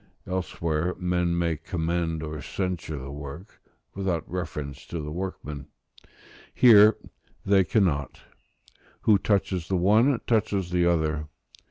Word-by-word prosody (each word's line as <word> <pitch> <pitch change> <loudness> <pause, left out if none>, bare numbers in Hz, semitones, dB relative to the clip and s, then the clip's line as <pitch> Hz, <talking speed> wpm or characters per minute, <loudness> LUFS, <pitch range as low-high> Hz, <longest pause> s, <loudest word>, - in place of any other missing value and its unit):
Elsewhere 90 -2 -2
men 90 -1 0
may 85 -1 +1
commend 80 -1 -2
or 75 -1 -5
censure 90 -2 -3
the 70 +1 -7
work, 75 +7 -9 0.3
without 95 -4 -2
reference 75 -6 -5
to 85 - -5
the 75 0 -5
workman; 75 -5 -6 0.9
here 110 -3 +7 0.5
they 95 -1 +4
cannot: 80 - 0 0.8
who 105 -3 +4
touches 95 -4 0
the 95 - 0
one, 110 +8 +4
touches 100 -5 0
the 90 -1 +2
other. 80 -3 0
85 Hz, 120 wpm, -26 LUFS, 75-95 Hz, 0.9 s, here